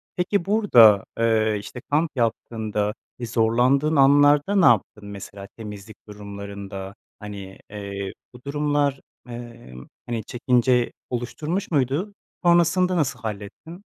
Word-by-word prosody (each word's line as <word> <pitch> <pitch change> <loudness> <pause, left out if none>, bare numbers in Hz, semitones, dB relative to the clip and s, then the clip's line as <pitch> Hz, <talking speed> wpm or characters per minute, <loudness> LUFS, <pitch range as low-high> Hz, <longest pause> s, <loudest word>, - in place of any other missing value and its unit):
Peki 180 0 0
burda, 120 - +6
eee, 110 -2 +2
işte 120 +4 -9
kamp 155 +2 +1
yaptığında, 110 -3 -1 0.3
ııı, 120 - -3
zorlandığın 125 +7 +2
anlarda 145 +6 +5
ne 190 - +5
yaptın? 105 -2 +2
Mesela 100 0 -9
temizlik 105 -1 -9
durumlarında, 100 -1 -8 0.2
hani, 100 -2 -9
eee, 100 -1 -6 0.2
bu 125 - -15
durumlar, 145 -1 0 0.3
emm, 120 - -10 0.2
hani 115 -3 -3
çekince 125 0 +1 0.2
oluşturmuş 150 - -3
muydu? 145 +8 0 0.3
Sonrasında 175 +1 +3
nasıl 140 -6 -1
hallettin? 110 - -8
120 Hz, 110 wpm, -23 LUFS, 105-145 Hz, 0.3 s, burda